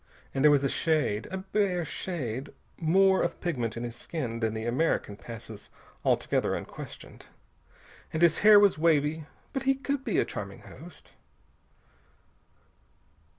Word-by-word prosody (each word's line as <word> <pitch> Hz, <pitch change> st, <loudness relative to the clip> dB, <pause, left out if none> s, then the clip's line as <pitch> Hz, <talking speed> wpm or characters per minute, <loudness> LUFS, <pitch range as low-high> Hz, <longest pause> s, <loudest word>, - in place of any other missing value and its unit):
And 135 Hz, -, 0 dB
there 150 Hz, -, +8 dB
was 145 Hz, -1 st, +4 dB
a -, -, +3 dB
shade 145 Hz, -8 st, 0 dB
a 190 Hz, -, -4 dB
bare 190 Hz, -2 st, 0 dB
shade 135 Hz, -7 st, -4 dB, 0.3 s
more 190 Hz, +4 st, +4 dB
of -, -, -2 dB
pigment 125 Hz, -10 st, -2 dB
in 115 Hz, -, -4 dB
his 120 Hz, -1 st, -5 dB
skin 120 Hz, -4 st, -4 dB
than 110 Hz, -1 st, -1 dB
the 110 Hz, 0 st, -4 dB
American 120 Hz, -4 st, 0 dB
passes 110 Hz, -1 st, -10 dB, 0.3 s
altogether -, -, +1 dB
unquestioned. -, -, -9 dB, 0.8 s
And 160 Hz, -, 0 dB
his 170 Hz, -2 st, +5 dB
hair 210 Hz, 0 st, +8 dB
was 200 Hz, -6 st, +4 dB
wavy.... 155 Hz, -1 st, +2 dB, 0.3 s
But 270 Hz, -, -1 dB
he 270 Hz, -, +4 dB
could 275 Hz, 0 st, -3 dB
be -, -, -1 dB
a -, -, +3 dB
charming -, -, -7 dB
host. -, -, -13 dB
155 Hz, 145 wpm, -28 LUFS, 120-185 Hz, 0.8 s, there